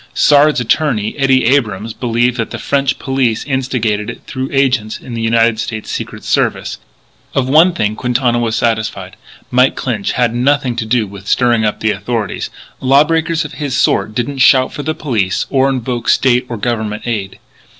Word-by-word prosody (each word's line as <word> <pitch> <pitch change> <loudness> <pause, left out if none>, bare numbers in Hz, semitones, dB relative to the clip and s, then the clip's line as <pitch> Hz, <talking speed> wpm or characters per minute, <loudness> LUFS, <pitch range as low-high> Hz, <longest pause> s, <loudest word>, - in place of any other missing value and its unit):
Sard's 150 0 +4
attorney, 120 -3 0
Eddie 135 -2 +2
Abrams, 115 -5 0
believed 120 +1 0
that 115 - -2
the - - -6
French 135 -1 0
police 130 -4 0
instigated 125 -6 -1
it - - -8
through 130 -1 -4
agents 130 -6 +1
of 125 - -10
the 115 - -3
United 115 0 +2
States 110 -2 -5
Secret - - -5
Service. - - -1 0.6
Of 130 -1 +1
one 160 +6 +5
thing 110 -7 -1
Quintana 125 0 0
was 115 -1 -1
satisfied, 115 -2 -2 0.4
Mike 125 +2 +3
Clinch 115 -6 -2
had 120 -2 +1
nothing 130 0 +1
to 110 - -3
do 115 -1 +1
with 100 0 -11
stirring 120 -2 +2
up 105 - -2
the 110 - +2
authorities. 105 +2 -3 0.3
Law 135 +2 +5
breakers 165 0 0
of 150 - -8
his 135 -4 -1
sort 110 -3 +1
don't 135 +4 -2
shout 130 -1 +4
for - - -5
the 155 +2 -2
police 110 -10 -1
or 135 0 +3
invoke 125 -2 -2
State 125 -1 +3
or 120 - -4
Government 110 -1 -3
aid. 105 -5 -3
125 Hz, 175 wpm, -15 LUFS, 110-135 Hz, 0.6 s, one